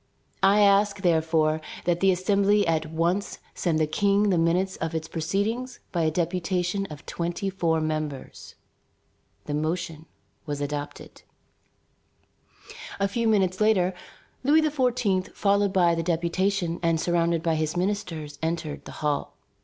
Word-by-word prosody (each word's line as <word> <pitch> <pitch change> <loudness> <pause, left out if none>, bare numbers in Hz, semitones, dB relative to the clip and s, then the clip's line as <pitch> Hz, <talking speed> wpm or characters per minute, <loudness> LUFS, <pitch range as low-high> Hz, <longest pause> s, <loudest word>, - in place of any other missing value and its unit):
I 200 +2 +5
ask, 200 0 +4
therefore, 160 -3 +2 0.2
that 175 0 +1
the 195 - +4
Assembly 200 +2 +2
at 160 -1 0
once 170 +5 -1 0.2
send 170 -3 0
the 155 - +2
King 200 +6 +2
the 180 - +2
minutes 180 +3 +1
of 165 0 -3
its 160 0 -3
proceedings 200 +11 -2
by 170 - 0
a 160 - +3
deputation 180 +3 -1
of 150 -4 -11
twenty 175 +3 -3
four 165 -4 +1
members." 155 -3 -4 0.9
The 145 - -4
motion 160 +1 -3 0.4
was 145 -1 -3
adopted. 145 0 -5 1.8
A 200 - +2
few 230 +3 -1
minutes 190 -3 +2
later, 190 -4 +3 0.5
Louis 305 +4 +4
XVI., 250 -10 0
followed 200 0 +2
by 175 -3 +3
the 165 - -1
deputation 175 +1 0
and 165 -2 +1
surrounded 170 -1 +1
by 165 - +1
his 155 +1 -1
ministers, 175 -7 -3
entered 160 -2 -3
the - - -8
hall. 145 -1 -1
175 Hz, 135 wpm, -26 LUFS, 160-200 Hz, 1.8 s, I